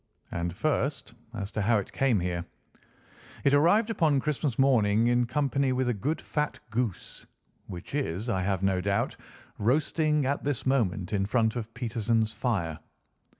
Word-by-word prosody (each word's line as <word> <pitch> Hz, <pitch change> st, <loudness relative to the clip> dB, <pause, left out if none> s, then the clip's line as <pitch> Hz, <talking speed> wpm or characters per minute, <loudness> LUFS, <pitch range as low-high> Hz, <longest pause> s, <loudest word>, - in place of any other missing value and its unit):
And, 85 Hz, 0 st, -2 dB
first, 140 Hz, -, -1 dB, 0.2 s
as 100 Hz, -1 st, -4 dB
to 110 Hz, -, -2 dB
how 110 Hz, +3 st, +3 dB
it 100 Hz, -, -4 dB
came 130 Hz, -6 st, +2 dB
here. 85 Hz, -1 st, -2 dB, 1.0 s
It 140 Hz, -, +3 dB
arrived 205 Hz, +10 st, +4 dB
upon 155 Hz, -9 st, +2 dB
Christmas 145 Hz, -2 st, -1 dB
morning, 115 Hz, -5 st, +4 dB
in 120 Hz, 0 st, +2 dB
company 140 Hz, +1 st, +1 dB
with 130 Hz, 0 st, 0 dB
a -, -, +2 dB
good 140 Hz, +10 st, -2 dB
fat 150 Hz, -1 st, -2 dB
goose, 110 Hz, -4 st, -3 dB, 0.4 s
which 90 Hz, +3 st, -9 dB
is, 115 Hz, -, -2 dB
I 95 Hz, -6 st, 0 dB
have 95 Hz, 0 st, -1 dB
no 95 Hz, -1 st, +2 dB
doubt, 100 Hz, +1 st, 0 dB, 0.4 s
roasting 150 Hz, +5 st, +2 dB
at 140 Hz, +2 st, -1 dB
this 145 Hz, -4 st, -2 dB
moment 105 Hz, -8 st, 0 dB
in 100 Hz, -1 st, +1 dB
front 110 Hz, 0 st, +1 dB
of 115 Hz, -2 st, -4 dB
Peterson's 115 Hz, -2 st, 0 dB
fire. 85 Hz, -11 st, -1 dB
120 Hz, 155 wpm, -28 LUFS, 100-140 Hz, 1.0 s, arrived